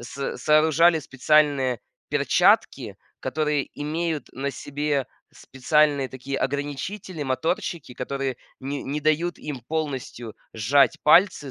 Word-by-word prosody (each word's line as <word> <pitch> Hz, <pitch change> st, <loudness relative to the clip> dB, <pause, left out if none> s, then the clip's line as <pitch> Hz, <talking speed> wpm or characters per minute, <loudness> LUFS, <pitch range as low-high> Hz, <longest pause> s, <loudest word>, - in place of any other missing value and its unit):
с 130 Hz, +4 st, -5 dB
сооружали 160 Hz, +2 st, +4 dB
специальные 135 Hz, -3 st, +2 dB, 0.3 s
перчатки, -, -, +2 dB, 0.2 s
которые 150 Hz, -2 st, -1 dB
имеют 155 Hz, +1 st, -3 dB
на 140 Hz, +2 st, -3 dB
себе 145 Hz, -1 st, -2 dB, 0.3 s
специальные 140 Hz, 0 st, +1 dB
такие 135 Hz, +1 st, -5 dB
ограничители, 145 Hz, +6 st, -4 dB
моторчики, 145 Hz, +1 st, -2 dB
которые 135 Hz, 0 st, -3 dB, 0.2 s
не 140 Hz, +1 st, -4 dB
не 145 Hz, +3 st, -3 dB
дают 155 Hz, +3 st, 0 dB
им 145 Hz, -4 st, -5 dB
полностью 130 Hz, -5 st, -5 dB, 0.2 s
сжать 140 Hz, +8 st, +3 dB
пальцы, 160 Hz, -3 st, +4 dB
145 Hz, 105 wpm, -24 LUFS, 135-155 Hz, 0.3 s, сооружали